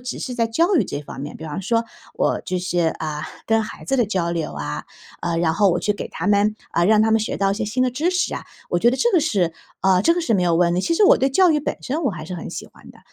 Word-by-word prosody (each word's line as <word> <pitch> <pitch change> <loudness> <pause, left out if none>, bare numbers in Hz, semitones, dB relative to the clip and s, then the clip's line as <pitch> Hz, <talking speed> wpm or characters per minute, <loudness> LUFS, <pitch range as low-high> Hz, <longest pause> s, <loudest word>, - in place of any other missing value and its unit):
只 250 0 -5
是 255 - -4
在 230 -2 +1
教 335 - +2
育 - - +3
这 145 - -5
方 140 - -10
面， 145 +1 -6
比 160 - -9
方 155 +3 -4
说 230 +3 +1 0.3
我 - - 0
就 185 - -2
是， 180 0 -2 0.2
啊， 155 -1 -4 0.2
跟 225 0 +3
孩 215 - -8
子 270 - 0
的 245 - +3
交 180 -5 -1
流 165 -2 -3
啊， 75 0 -5 0.4
呃， 170 -1 -1
然 165 -1 +2
后 200 0 +4
我 175 - +1
去 210 - +1
给 - - -5
他 165 - -5
们 210 +1 +3 0.2
呃， 170 - +3
让 215 0 +5
他 220 - +2
们 220 - +4
学 215 - -2
到 195 0 +2
一 195 - 0
些 225 - -2
新 230 +5 0
的 255 - +2
知 300 +8 0
识 365 0 0
啊， - - -6 0.3
我 175 - +2
觉 235 +7 +4
得 255 - -1
这 475 - +3
个 355 - +5
是 200 - +1 0.3
呃， 185 -1 +4
这 335 - +4
个 350 - -1
是 280 -10 +1
没 185 - +2
有 170 -1 +2
问 175 0 +3
的， 180 - +1
其 335 - 0
实 410 - +4
我 - - +7
对 270 +1 +2
教 365 +5 +5
育 305 - +3
本 285 - -3
身 295 +6 -2
我 260 - +2
还 160 -5 -7
是 180 - -5
很 170 - -6
喜 - - -6
欢 - - -17
的。 - - -18
210 Hz, 330 characters per minute, -21 LUFS, 175-255 Hz, 0.4 s, 我